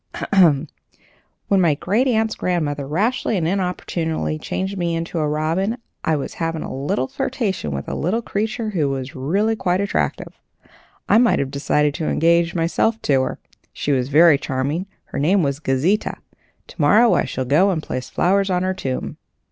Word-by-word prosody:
Ahem! 160 -6 +5 0.8
When 195 -2 +3
my 160 -4 +3
great 210 - +1
aunt's 220 -3 +1
grandmother 150 -6 -2
rashly 210 - 0
and 165 -3 0
inopportunely 165 - -2
changed 190 +1 -3
me 170 -3 -1
into 165 0 -3
a 155 - +1
robin, 165 +9 -1 0.3
I 160 - +1
was 140 - -4
having 165 -1 -2
a - - -6
little 130 -1 -1
flirtation 205 - -2
with 70 -1 -4
a - - -4
little 215 +9 -1
creature 215 +2 -2
who 155 -8 0
was 135 -1 -4
really 195 +12 0
quite 180 -3 0
attractive. 200 0 -2 0.7
I 215 - +5
might 240 -1 +4
have 135 -1 -2
decided 145 +1 +1
to 160 0 -3
engage 170 +1 +2
myself 175 +7 +1
to 135 -2 +3
her. - - -3 0.3
She 145 - -2
was 130 -1 0
very 155 0 +6
charming. 145 +6 -2 0.2
Her - - -6
name 180 +6 +3
was 140 -1 -1
Gauzita. 155 +9 0 0.5
To - - -7
morrow 215 +11 +5
I - - +2
shall 130 - -3
go 155 +10 +4
and 165 -5 -1
place 130 0 -5
flowers 195 +2 +1
on 180 -1 +1
her 185 0 0
tomb." 135 -9 -4
165 Hz, 175 wpm, -21 LUFS, 145-195 Hz, 0.8 s, very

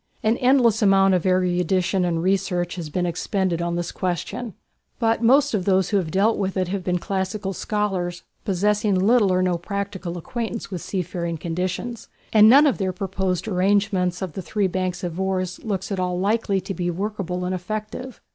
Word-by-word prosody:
An 220 +2 +3
endless 250 -4 +4
amount 195 -1 +5
of 180 0 +1
erudition 185 0 +1
and 165 -1 -1
research 180 -2 0
has 170 -4 -5
been 180 +4 -1
expended 175 0 -1
on 170 0 -1
this 175 0 -3
question; 185 +4 -3 0.4
but 225 -1 +1
most 270 +4 +4
of 195 -4 0
those 190 -2 +2
who 205 - +2
have 180 -5 -1
dealt 200 +6 +2
with 195 -1 -1
it 185 -1 0
have 195 -1 -3
been 180 0 0
classical 195 +1 -3
scholars 185 -4 -2 0.2
possessing 205 +1 +1
little 205 +2 +4
or 185 0 +2
no 180 -2 +1
practical 195 -2 -4
acquaintance 230 +2 -5
with 180 -3 -4
seafaring 175 -3 -3
conditions, 180 +8 -4 0.3
and 215 0 +8
none 280 +5 +8
of 280 - +2
their 190 -2 0
proposed 190 0 -2
arrangements 190 -2 +1
of 180 -5 -5
three 200 +2 -2
banks 185 -1 -2
of 175 0 -4
oars 185 -1 -2
looks 200 -3 -3
at 195 - -1
all 180 -1 -1
likely 200 0 +1
to 190 +2 -5
be 175 -2 -2
workable 180 -1 -3
and 185 - -1
effective. 215 +6 -5
190 Hz, 180 wpm, -23 LUFS, 180-210 Hz, 0.4 s, and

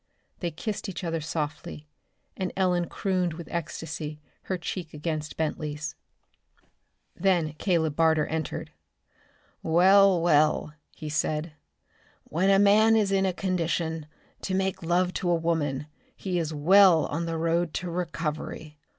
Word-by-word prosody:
They 175 - -2
kissed 205 +5 -4
each 185 -1 -6
other 165 -2 -2
softly, 150 -1 -5 0.5
and 185 -1 -3
Ellen 180 -2 +1
crooned 185 -3 -1
with 170 0 -8
ecstasy, 160 -2 -5 0.3
her 185 - -2
cheek 170 -2 -6
against 155 0 -4
Bentley's. 150 -1 -3 1.2
Then 175 -6 +1
Caleb 160 -6 +1
Barter 160 -2 +3
entered. 160 -1 -4 0.9
"Well, 190 +3 +5
well," 155 -2 +2 0.2
he 155 - -7
said, 155 +1 -1 0.7
"when 180 +5 0
a 195 - +6
man 210 +3 +5
is 210 -3 +2
in 190 -1 +2
condition 165 -4 -2 0.3
to 185 - -2
make 190 0 -1
love 180 +2 +1
to 180 - -2
a 175 - +4
woman, 155 -4 -1 0.3
he 185 -2 -2
is 160 -2 -2
well 170 +2 +6
on 170 +3 -3
the 165 0 -2
road 165 0 0
to 180 -1 -3
recovery. 155 -2 -4
170 Hz, 135 wpm, -27 LUFS, 155-185 Hz, 1.2 s, a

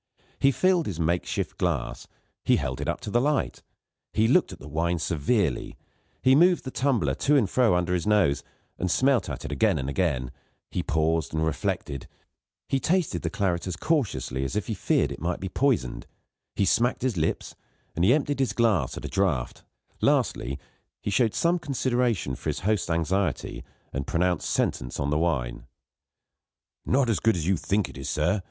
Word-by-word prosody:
He 135 - +5
filled 180 +2 +2
his 85 -5 -4
makeshift 85 +2 -1
glass, - - -2 0.4
he - - +4
held - - -2
it - - -3
up - - -2
to 105 - -5
the 120 - +3
light, 145 +1 0 0.5
and 110 +1 +3
looked 175 - +4
at 95 - -8
the - - -11
wine 85 +3 0
severely; 80 - 0 0.5
he 130 - +6
moved 175 +5 +5
the 130 - -6
tumbler 120 - +1
to 145 - +2
and 115 -7 +3
fro 115 -3 +3
under 90 0 0
his 90 +2 -1
nose, 100 -9 +3 0.4
and 90 - -1
smelt 130 +1 +2
at - - -6
it - - -5
again - - +2
and 65 - -3
again; 70 -8 0 0.4
he - - -1
paused 80 -1 0
and 80 0 +1
reflected; 70 -3 -2 0.6
he 135 - +1
tasted 165 - 0
the 80 - -2
claret 90 -2 -1
as 90 - -3
cautiously 80 - -1
as 70 - -3
if 105 -3 -1
he 115 - -3
feared 95 - +1
it - - -7
might 85 +1 -1
be 95 - -4
poisoned; 115 - 0 0.5
he 100 - +2
smacked 120 +6 +2
his 130 -5 0
lips, 80 -2 -1 0.4
and 85 - 0
emptied 140 +6 +2
his 135 - +1
glass 115 -8 +1
at - - -6
a - - -2
draught; 90 -11 -1 0.4
lastly, 70 +2 +1 0.4
he 105 - -3
showed 110 +2 +2
some 175 +1 +2
consideration 125 - 0
for - - -4
his - - -3
host's 105 -2 0
anxiety, 85 +1 -1 0.3
and 65 0 -3
pronounced 90 -1 0
sentence - - -1
on 70 +1 -1
the 75 - +2
wine. 65 -8 -1 1.2
"Not 130 0 +3
so 115 - +3
good 115 -2 +3
as 85 -3 -2
you 95 +2 +3
think 100 +4 0
it, - - -9
sir. 90 +7 +1
95 Hz, 185 wpm, -26 LUFS, 80-125 Hz, 1.2 s, he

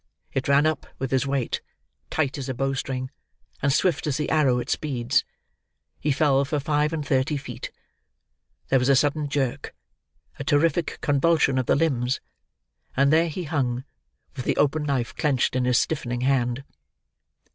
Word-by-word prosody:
It 135 - -1
ran 140 +1 +4
up 155 0 0
with 135 -1 -3
his 135 +1 +1
weight, 135 -3 -1 0.5
tight 145 -3 -1
as 135 -1 -5
a 130 - -2
bow 135 +2 0
string, 130 -1 -3 0.5
and 140 - +2
swift 175 +3 +1
as 140 - 0
the 150 - -2
arrow 140 -5 +3
it 120 - -3
speeds. 130 -2 0 0.8
He 150 - 0
fell 140 -1 +3
for 145 +2 -1
five 150 +1 +1
and 155 -3 -3
thirty 135 +2 +1
feet. 140 - -7 1.0
There 135 - +4
was 125 +2 +1
a 140 - +6
sudden 145 +2 +1
jerk, 135 -3 -2 0.6
a - - -3
terrific 165 +3 +1
convulsion 145 -2 +3
of 130 - -2
the - - +4
limbs; 130 -5 +1 0.8
and 140 +2 +4
there 165 +2 +4
he 175 +4 -4
hung, 130 -6 -1 0.5
with 130 - -5
the - - 0
open 150 +1 +2
knife 135 -5 -1
clenched 140 -5 +1
in 130 -1 +1
his 125 -1 +3
stiffening 120 -6 -1
hand. 125 -1 +1
140 Hz, 170 wpm, -25 LUFS, 130-150 Hz, 1.0 s, a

